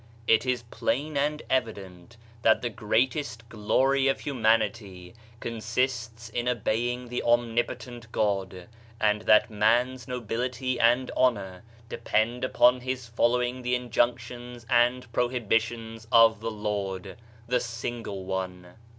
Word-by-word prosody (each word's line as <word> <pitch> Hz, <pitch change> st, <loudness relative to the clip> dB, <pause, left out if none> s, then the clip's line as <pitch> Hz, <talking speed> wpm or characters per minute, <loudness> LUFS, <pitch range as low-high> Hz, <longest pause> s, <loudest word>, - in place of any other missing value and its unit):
It 115 Hz, +3 st, +3 dB
is 125 Hz, -2 st, 0 dB
plain 150 Hz, +3 st, -1 dB
and 150 Hz, +2 st, 0 dB
evident 105 Hz, -4 st, -3 dB, 0.2 s
that 110 Hz, -, +3 dB
the 120 Hz, -, -1 dB
greatest 115 Hz, +2 st, -1 dB
glory 135 Hz, +6 st, +2 dB
of 135 Hz, -, +1 dB
humanity 110 Hz, -8 st, 0 dB, 0.3 s
consists 115 Hz, 0 st, -2 dB
in 120 Hz, +2 st, -3 dB
obeying 120 Hz, +2 st, -1 dB
the 125 Hz, -, -2 dB
Omnipotent 120 Hz, 0 st, -1 dB
God, 95 Hz, -4 st, -1 dB, 0.3 s
and 105 Hz, -1 st, +2 dB, 0.2 s
man's 120 Hz, +4 st, +1 dB
nobility 125 Hz, +1 st, -3 dB
and 120 Hz, +2 st, +3 dB
honor 100 Hz, -8 st, +1 dB, 0.3 s
depend 115 Hz, +1 st, -1 dB
upon 125 Hz, 0 st, +4 dB
his 125 Hz, -1 st, -4 dB
following 125 Hz, +2 st, +1 dB
the 125 Hz, 0 st, 0 dB
injunctions 120 Hz, 0 st, -2 dB
ad 120 Hz, +1 st, +3 dB
prohibitions 115 Hz, -2 st, -1 dB
of 115 Hz, -2 st, +6 dB
the 115 Hz, +1 st, -3 dB
Lord, 100 Hz, -3 st, -4 dB, 0.3 s
the 125 Hz, +1 st, +2 dB
Single 115 Hz, -4 st, -5 dB
One. 90 Hz, -2 st, -5 dB
120 Hz, 115 wpm, -27 LUFS, 110-125 Hz, 0.3 s, of